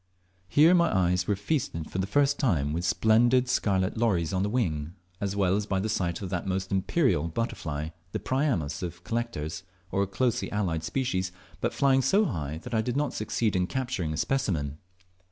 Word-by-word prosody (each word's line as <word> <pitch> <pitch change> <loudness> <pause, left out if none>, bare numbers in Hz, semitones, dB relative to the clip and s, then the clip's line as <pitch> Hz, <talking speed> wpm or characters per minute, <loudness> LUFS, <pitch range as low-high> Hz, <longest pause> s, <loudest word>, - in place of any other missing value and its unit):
Here 155 - +6
my 170 -2 +4
eyes 90 -1 +2
were 105 - +2
feasted 100 - -2
for 95 - -3
the 95 - 0
first 145 +6 +2
time 75 - +1
with 85 +2 -2
splendid 120 +6 +4
scarlet 100 -5 +1
lories 95 -9 +1
on 95 - +1
the 100 - 0
wing, 85 -9 -1 0.2
as 100 -1 -2
well 95 -2 +2
as 105 0 -1
by 95 -2 0
the 110 +3 -1
sight 85 -1 -1
of 95 - -5
that 90 +1 -2
most 95 0 -2
imperial 95 - +2
butterfly, 80 -6 -3 0.2
the 110 - -2
"Priamus" 105 - -1
of 85 -1 -6
collectors, 115 -9 -3 0.3
or 100 - +1
a 100 - +1
closely 120 +4 0
allied 90 -6 -1
species, 95 -5 -1 0.3
but 120 - 0
flying 135 -1 +3
so 195 - +3
high 75 - -3
that - - -7
I 110 - +3
did 125 +3 -2
not 150 0 0
succeed 110 0 -1
in 90 -1 +1
capturing 125 -11 -2
a 75 - -3
specimen. 80 - -1
100 Hz, 190 wpm, -28 LUFS, 85-120 Hz, 0.3 s, Here